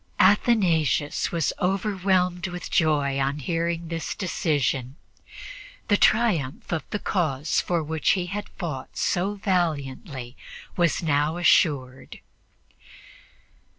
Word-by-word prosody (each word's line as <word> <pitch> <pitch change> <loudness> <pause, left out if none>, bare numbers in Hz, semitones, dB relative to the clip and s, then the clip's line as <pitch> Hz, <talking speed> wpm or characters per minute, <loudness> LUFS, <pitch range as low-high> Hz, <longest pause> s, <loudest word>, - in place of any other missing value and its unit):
Athanasius 180 - +3
was 165 -4 0
overwhelmed 185 -1 0
with 180 0 -7
joy 145 -4 +2
on 135 +2 0
hearing 170 +3 -2
this 165 -1 -4
decision. 140 - -1 0.9
The 205 - +5
triumph 180 - +1
of 165 -2 -3
the - - -2
cause 155 -8 0
for 170 -2 -1
which 160 +1 -1
he 185 -2 -1
had 205 +4 -5
fought 150 -8 -6
so 190 +4 0
valiantly 145 - -2 0.4
was 175 0 +1
now 150 +1 +1
assured. 140 -7 +1
165 Hz, 105 wpm, -25 LUFS, 145-185 Hz, 0.9 s, The